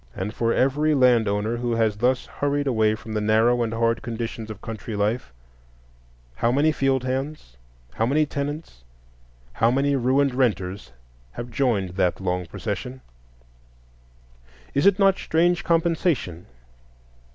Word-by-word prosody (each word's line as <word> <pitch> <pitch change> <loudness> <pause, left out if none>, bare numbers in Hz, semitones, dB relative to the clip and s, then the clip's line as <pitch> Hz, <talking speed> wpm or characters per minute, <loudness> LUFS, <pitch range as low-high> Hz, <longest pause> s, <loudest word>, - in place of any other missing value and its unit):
And 100 +3 -4
for 115 -1 0
every 145 +5 +2
land 125 -4 +4
owner 105 +3 -1
who 120 0 -1
has 110 -2 +1
thus 125 +3 +1
hurried 145 0 -2
away 110 -5 +2
from 110 0 -9
the 105 - -1
narrow 110 +3 +3
and 115 -1 -1
hard 115 0 0
conditions 115 -1 -5
of 105 -2 -7
country 110 0 -6
life, 105 - -1 1.1
how 115 - +2
many 145 +5 +3
field 135 -3 0
hands, 130 - -4 0.4
how 115 - 0
many 150 +4 +2
tenants, 145 - -5 0.7
how 115 - +2
many 140 +3 +1
ruined 135 +1 +2
renters, 100 - -1 0.4
have 120 0 -7
joined 115 -9 0
that 90 -2 +1
long 90 -2 -2
procession? 120 +8 -5 1.7
Is 140 +7 +3
it 200 -1 +5
not 195 -1 +3
strange 175 +3 +1
compensation? 165 - 0
120 Hz, 140 wpm, -24 LUFS, 110-140 Hz, 1.7 s, it